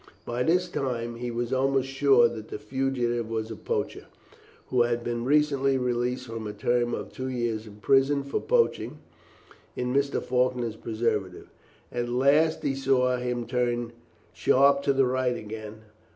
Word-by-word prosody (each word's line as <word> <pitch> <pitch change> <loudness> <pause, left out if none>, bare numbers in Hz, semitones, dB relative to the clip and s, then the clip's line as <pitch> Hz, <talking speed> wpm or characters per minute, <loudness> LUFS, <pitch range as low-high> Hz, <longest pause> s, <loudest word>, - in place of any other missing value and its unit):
By 120 +1 -2
this 180 +6 +2
time 120 -5 -3
he 120 +1 -4
was 120 +1 -2
almost 135 0 +1
sure 135 -3 +5
that 110 -2 -7
the - - -6
fugitive 120 0 -1
was 110 0 -3
a - - -5
poacher, - - -3 0.6
who 125 - +3
had 120 0 +1
been 120 0 -2
recently 140 -1 +3
released 125 0 -1
from 115 -2 -6
a 105 - -5
term 120 +1 0
of - - -7
two 130 - -4
years 120 -4 -2
in 105 - -12
prison 135 +6 +3
for 140 - -2
poaching 480 -1 +1 0.8
in 125 0 -2
Mr. 140 0 +1
Faulkner's 125 -2 0
preserves. 110 -5 -2 0.5
At 120 0 -2
last 140 +6 +3
he 135 - +1
saw 130 -2 +2
him 125 -1 -2
turn 120 -1 -1 0.4
sharp 140 +1 +4
to - - +5
the 135 0 +3
right 125 -1 0
again. 110 0 -8
125 Hz, 160 wpm, -27 LUFS, 120-135 Hz, 0.8 s, sure